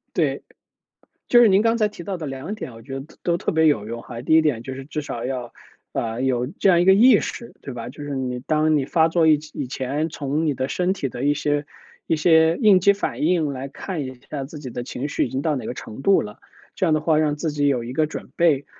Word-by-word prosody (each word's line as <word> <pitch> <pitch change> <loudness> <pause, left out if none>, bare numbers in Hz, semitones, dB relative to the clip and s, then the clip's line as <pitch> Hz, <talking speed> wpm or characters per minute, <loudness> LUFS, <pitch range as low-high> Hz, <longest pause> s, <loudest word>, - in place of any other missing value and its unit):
对。 - - 0 0.8
就 240 - +6
是 235 - +7
您 195 +1 +4
刚 230 +1 +2
才 215 -2 +3
提 205 -4 -10
到 190 -1 -4
的 160 - -5
2 135 +9 -5
点 215 - -7
啊， - - -14
我 115 - -12
觉 135 +3 -6
得 135 - -10 0.2
都 170 -1 +1
特 - - -1
别 160 0 +3
有 110 -9 +2
用 115 +1 -6
哈。 115 - -8
第 145 +6 +1
一 160 - +6
点 140 -8 0
就 130 +2 -6
是 135 0 -8
至 150 +2 -4
少 120 -5 -5
要， 125 -2 -4 0.4
呃， 115 +1 -3
有 125 -2 +1
这 180 +7 0
样 175 -2 +5
一 - - +2
个 190 - +7
意 220 +3 +7
识， 235 - -6
对 135 - -7
吧？ 120 -1 -6
就 145 +3 -9
是 145 -1 -4
你 125 -2 -3
当 155 +3 +2
你 140 - +1
发 160 +3 +3
作 165 0 +2
以 155 -1 +5
前 145 +1 -4
从 145 +1 -2
你 150 - +2
的 130 0 -2
身 180 +5 0
体 180 -8 -3
的 125 +1 -5
一 145 - +4
些 145 0 -1 0.4
一 - - +2
些 160 +1 +4
应 210 -5 +6
激 195 +2 +5
反 145 -10 -4
应 160 -2 +2
来 135 +1 -5
看 165 +3 -5
一 130 -1 -9
下 140 -3 -3
自 150 +3 -9
己 140 -3 -7
的 125 0 -5
情 130 +2 -4
绪 - - 0
已 - - -5
经 130 - -2
到 150 0 0
哪 130 - -5
个 - - -4
程 125 0 -9
度 195 +4 +4
了， 105 +3 -8 0.4
这 - - -1
样 165 - +3
的 155 - +2
话 155 0 +2
让 155 -1 +2
自 160 +1 -2
己 145 -1 0
有 125 -4 0
一 120 +2 -6
个 155 +2 +2
准 155 - -8
备。 155 -5 +3
150 Hz, 285 characters per minute, -22 LUFS, 130-165 Hz, 0.8 s, 是